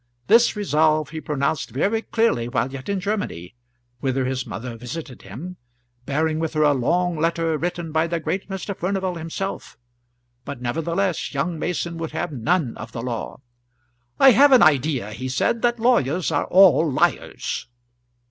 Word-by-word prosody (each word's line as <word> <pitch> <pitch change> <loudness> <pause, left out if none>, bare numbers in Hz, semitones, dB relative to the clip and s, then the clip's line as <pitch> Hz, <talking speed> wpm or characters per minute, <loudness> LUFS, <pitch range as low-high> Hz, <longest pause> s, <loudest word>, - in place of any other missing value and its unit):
This 230 +3 +5
resolve 155 -6 +2
he 160 -1 -5
pronounced 150 0 -1
very 200 - 0
clearly 225 - 0
while 130 +1 -1
yet 135 +3 -8
in 200 -1 0
Germany, 185 - -3 0.5
whither 130 0 -1
his 130 -1 -3
mother 120 0 -6
visited 125 +3 -8
him, 155 - -9 0.5
bearing 155 +2 0
with 160 -1 -3
her 155 - +3
a 145 -1 +4
long 170 +6 0
letter 165 0 0
written 170 0 -3
by 160 +1 +1
the 170 0 -2
great 190 +5 -3
Mr. 195 +1 -4
Furnival 190 0 -2
himself. 170 +4 -5 0.7
But 140 -2 -7
nevertheless 165 +7 -2
young 160 +4 -1
Mason 170 0 -2
would 165 -2 -5
have 160 +1 -3
none 145 +1 0
of 115 +1 -9
the 115 - -5
law. 120 +1 -5 0.8
"I 270 - +8
have 280 +4 +6
an 255 -6 +7
idea," 140 -7 +2
he 130 +4 -5
said, 175 - 0
"that 240 0 +2
lawyers 180 - +2
are 145 - 0
all 175 -4 +5
liars." 125 - -1
160 Hz, 160 wpm, -22 LUFS, 135-180 Hz, 0.8 s, I